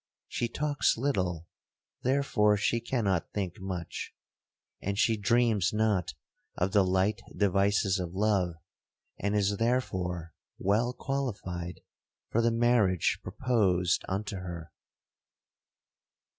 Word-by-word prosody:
She 120 - -1
talks 145 +2 +1
little, 90 - -1 0.6
therefore 125 -6 +3
she 115 +3 +1
cannot 105 -8 -1
think 95 -4 -3
much; 95 -3 -5 0.7
and 100 +1 -2
she 115 +1 +3
dreams 110 -2 +2
not 105 -5 +1 0.4
of 90 +2 +1
the 100 -1 +5
light 95 +3 +1 0.2
devices 100 -1 +2
of 90 0 -4
love, 95 -4 +1 0.6
and 100 +1 0
is 100 0 +2
therefore 90 -8 -1 0.2
well 110 +5 +1
qualified 100 -12 -4 0.5
for 115 - +3
the 115 - +3
marriage 115 -6 +2
proposed 95 -5 +1
unto 100 +1 -2
her. 85 -3 -7
100 Hz, 105 wpm, -29 LUFS, 90-115 Hz, 0.7 s, the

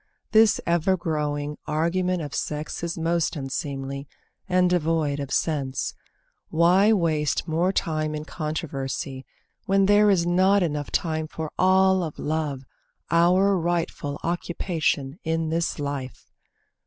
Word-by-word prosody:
This 220 -1 +5
ever 175 +2 +2
growing 150 -3 -2
argument 170 +3 0
of 145 - -7
sex 150 0 -3
Is 170 0 -3
most 165 +1 0
unseemly, 140 0 -4 0.4
and 180 0 +4
devoid 160 -4 +1
of 140 -2 -4
sense. 140 -5 -1 0.6
Why 180 +6 +4
waste 160 -7 +1
more 170 +3 +1
time 155 -4 -1
in 150 0 -5
controversy, 140 -4 -4 0.4
when 195 0 +4
There 205 +1 +5
is 180 -4 +3
not 190 +3 +3 0.3
time 160 -2 0
enough - - -13
for 160 -1 -5
all 190 0 +4
of 160 -4 -5
love, 150 -3 -2 0.5
Our 180 +4 +4
rightful 165 -4 -2
occupation 165 -3 -1
in 160 -1 -1
this 165 +1 -1
life? 140 -4 -5
165 Hz, 125 wpm, -25 LUFS, 150-180 Hz, 0.6 s, This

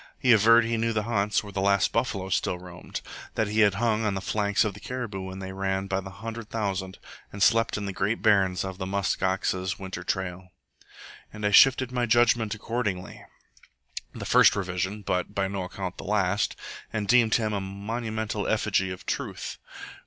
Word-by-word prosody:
He 125 - +3
averred 115 +2 +6
he 115 0 0
knew 115 0 0
the 110 -1 0
haunts 105 -2 0
where 100 -1 -10
the 95 - -1
last 100 -1 +3
buffalo 105 -6 -1
still 90 - 0
roamed; 90 0 -8 0.3
that 110 - +1
he 110 +1 0
had 105 -2 +5
hung 110 0 +1
on 105 -2 0
the - - -1
flanks 105 +2 +1
of 105 - -2
the 105 - -11
caribou 120 -6 -5
when 95 0 -7
they 95 0 -6
ran 95 0 -2
by 95 0 -1
the 95 - -8
hundred 110 +3 -7
thousand, 95 -4 -3 0.3
and 100 0 -1
slept 115 +1 +3
in 105 - -4
the 100 - -4
Great 100 +5 -1
Barrens 95 -4 +3
on 95 -1 -6
the 95 -1 -4
musk 100 +1 -1
ox's 95 0 0
winter 95 -2 -6
trail. 90 0 -3 0.8
And 105 -1 -6
I 105 - +2
shifted 130 +3 +6
my 125 -1 0
judgment 115 -2 +3
accordingly 105 -4 -4 0.9
(the - - -7
first - - +6
revision, 95 +2 -3
but 90 +2 -2
by 100 -1 +1
no 95 -1 -3
account 90 0 -6
the - - -6
last), 100 -1 +1 0.4
and 105 -2 -2
deemed 120 -2 +5
him 110 -2 0
a 100 - -1
monumental 110 +2 -3
effigy 105 -3 +1
of 90 0 -7
truth. - - -4
100 Hz, 190 wpm, -26 LUFS, 95-110 Hz, 0.9 s, averred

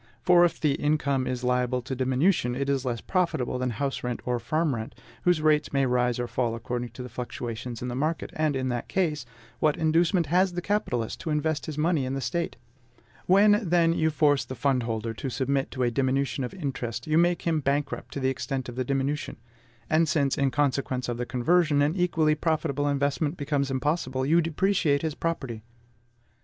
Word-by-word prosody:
For, 175 -1 +6
if 175 - +1
the 150 - +2
income 140 -3 0
is 125 0 -3
liable 125 0 +1
to 130 - -5
diminution, 130 +1 +1
it 140 +1 -2
is 135 -1 0
less 120 -3 -2
profitable 170 -9 -1
than 125 0 0
house 135 +4 -3
rent 125 -1 -2
or 125 -1 0
farm 155 +6 0
rent, 110 -2 -5 0.3
whose 175 -3 +3
rates 150 -1 +3
may 140 -1 +2
rise 125 -1 +1
or 120 0 -2
fall 120 0 -1
according 120 +1 -4
to 125 - -7
the - - -6
fluctuations 120 -1 -6
in - - -3
the 120 - -3
market; 155 +6 -2
and 155 -2 0
in 130 -1 -1
that 120 -1 -3
case, 155 -9 -1 0.3
what 150 -1 +2
inducement 165 +2 +2
has 180 +4 +2
the 175 - -2
capitalist 185 - -1
to - - -5
invest 155 0 -1
his 155 -2 -5
money 155 -2 +1
in 130 +1 -2
the - - -2
State? 170 +5 -2 0.7
When, 205 +3 +6
then, 170 -4 +3
you 160 -1 +2
force 145 -2 +2
the 130 - -7
fund 130 +1 +1
holder 115 -1 -3
to 130 +4 -5
submit 135 +2 -1
to 130 - -2
a 120 - +2
diminution 135 +2 0
of 125 - -5
interest, 130 -8 -4
you 155 +1 +3
make 175 0 +2
him 165 -2 +1
bankrupt 140 0 -2
to - - -2
the 130 -1 +1
extent 130 0 -3
of 120 - -8
the 130 - -1
diminution; 140 +3 -2 0.5
and 160 0 +2
since, 140 -4 +2
in 140 -2 +2
consequence 135 -3 0
of 120 - -2
the 125 0 -3
conversion, 145 +3 +2
an 150 +3 +1
equally 165 -4 +2
profitable 150 -2 0
investment 145 +3 0
becomes 140 -1 -1
impossible, 130 -1 -1
you 165 +4 +4
depreciate 165 -3 +1
his 160 -2 -1
property. 135 -9 -3
140 Hz, 200 wpm, -27 LUFS, 125-160 Hz, 0.7 s, For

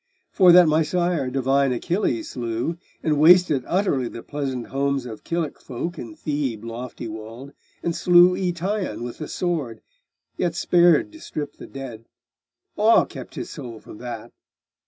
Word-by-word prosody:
For 185 -3 +6
that 175 -1 +8
my 155 +1 +3
sire 170 -4 0
divine 135 +1 +2
Achilles 125 - -1
slew, 120 +7 -3 0.2
And 150 -2 +1
wasted 160 -4 +6
utterly 170 -9 +1
the 115 - -8
pleasant 135 -4 -4
homes 140 -1 -1
Of 110 -3 -8
Kilic 165 -3 -3
folk 160 +7 -5
in 115 -3 -8
Thebe 140 -8 -3
lofty 115 +1 -6
walled, 110 +5 -8 0.3
And 170 -1 -1
slew 175 0 +6
Eetion 185 - -2
with 120 -1 -7
the 155 - -5
sword! 150 -11 -2 0.6
yet 175 -2 -1
spared 175 - +4
To 315 - -13
strip 150 - -6
the - - -10
dead: 125 -5 -8 0.7
awe 220 +2 +5
kept - - -10
his - - -6
soul 120 -8 -8
from 105 - -13
that. 120 -3 -7
145 Hz, 155 wpm, -23 LUFS, 125-175 Hz, 0.7 s, that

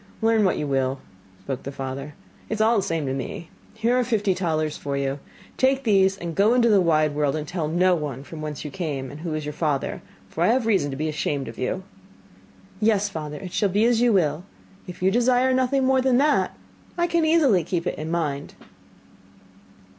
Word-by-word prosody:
'Learn 225 -1 +4
what 185 - +2
you 150 - -2
will,' 135 -1 0 0.4
spoke 135 -2 -4
the 140 - -6
father, 135 +2 -6 0.3
'it 220 - -1
is - - -7
all 220 +1 +4
the - - +2
same 165 -5 -2
to 135 - -2
me. 135 +5 -6 0.2
Here 230 +3 +1
are - - +2
fifty 210 -5 +1
talers 155 -4 -1
for 140 -1 -4
you. 140 0 -2 0.4
Take 265 +1 +2
these 195 -4 +3
and 170 -2 -5
go 210 +7 +3
into 235 -2 +4
the 205 -3 +5
wide 155 -3 +2
world, 145 -1 0
and 155 -1 -4
tell 170 -3 -2
no 180 +3 +3
one 145 -5 -3
from 155 +2 -9
whence 150 -1 -5
you 150 - -5
come, 145 -8 -4
and 145 - -9
who 160 -1 -4
is 155 -1 -4
your 150 - -4
father, 150 -4 -2 0.3
for 160 - -6
I - - +4
have 245 +1 +2
reason 195 -10 +2
to 135 - -5
be 155 +2 -1
ashamed 145 -2 -2
of - - -9
you.' 130 +9 -2 1.0
'Yes, 210 -2 +2
father, 150 -5 -6
it 185 0 -8
shall 205 -1 +1
be 205 +4 +2
as 235 -1 +3
you 245 -1 +4
will. 165 -5 +1 0.4
If 180 0 -8
you 190 - +4
desire 250 +3 +3
nothing 260 +1 +2
more 265 0 +3
than 255 -1 +3
that, 295 +2 +2 0.4
I 345 - +2
can 340 -1 +1
easily 300 - +4
keep 170 +1 -2
it - - -3
in 155 +1 -4
mind. 150 -4 -2
175 Hz, 215 wpm, -24 LUFS, 150-225 Hz, 1.0 s, the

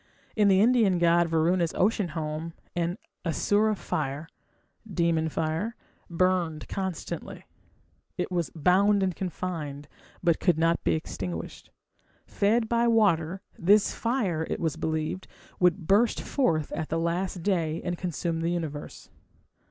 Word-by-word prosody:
In 210 -2 +4
the 190 -1 +5
Indian 225 -5 +4
god 170 0 +4
Varuna's 165 +1 +1
ocean 205 0 +2
home 155 +1 -4 0.2
an 175 +2 -1 0.3
"Asura 205 +6 +2
fire" 150 -4 -3 0.6
(demon 165 -2 +1
fire) 165 +9 -2 0.3
burned 175 -2 0
constantly; 190 -4 -5 0.7
it - - -2
was 175 -3 -1
"bound 195 +5 +4
and 185 -3 0
confined", 165 -6 -4 0.4
but 170 -2 +3
could 175 -4 +2
not 165 +1 +2
be - - +2
extinguished. 90 - -6 0.6
Fed 220 +3 +1
by 235 +1 +2
water, 190 -6 +2 0.2
this 200 +4 +4
fire, 200 -10 -1
it - - -2
was 160 -2 -1
believed, 160 +3 -2 0.3
would 180 -1 +2
burst 210 +7 +3
forth 160 - 0
at 155 - -3
the 165 - 0
last 170 +2 -1
day 165 -5 0
and 175 -1 -2
consume 170 -1 -3
the 165 - 0
universe. 160 -4 -5
175 Hz, 130 wpm, -27 LUFS, 160-195 Hz, 0.7 s, the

